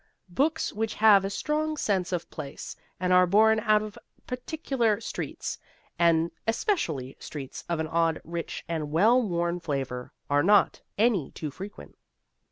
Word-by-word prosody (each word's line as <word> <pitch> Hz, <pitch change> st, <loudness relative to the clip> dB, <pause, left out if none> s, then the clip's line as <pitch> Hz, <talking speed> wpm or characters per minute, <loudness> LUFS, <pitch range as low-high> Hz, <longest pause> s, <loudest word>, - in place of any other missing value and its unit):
Books 300 Hz, -, 0 dB
which 220 Hz, +1 st, -2 dB
have 210 Hz, -3 st, +6 dB
a 195 Hz, -, -1 dB
strong 305 Hz, +7 st, -1 dB
sense 190 Hz, -8 st, 0 dB
of 175 Hz, -2 st, -2 dB
place, 140 Hz, -, -7 dB, 0.2 s
and 185 Hz, 0 st, +1 dB
are 180 Hz, 0 st, +6 dB
born 220 Hz, +4 st, +5 dB
out 215 Hz, -1 st, +3 dB
of 215 Hz, -1 st, -8 dB, 0.3 s
particular 250 Hz, -4 st, -1 dB
streets -, -, -5 dB, 0.4 s
and 170 Hz, -1 st, +3 dB, 0.2 s
especially 165 Hz, -, -1 dB
streets 140 Hz, -4 st, -7 dB
of 170 Hz, -2 st, 0 dB
an 160 Hz, -, -1 dB
odd, 165 Hz, 0 st, +1 dB
rich, 170 Hz, 0 st, -5 dB
and 160 Hz, -3 st, -3 dB
well 215 Hz, +11 st, +4 dB
worn 175 Hz, -4 st, -1 dB
flavour 135 Hz, -6 st, -4 dB, 0.2 s
are 145 Hz, 0 st, +3 dB
not 205 Hz, +6 st, +4 dB, 0.2 s
any 205 Hz, -, +2 dB
too 155 Hz, -2 st, -6 dB
frequent. 195 Hz, +8 st, -10 dB
185 Hz, 150 wpm, -27 LUFS, 165-220 Hz, 0.4 s, have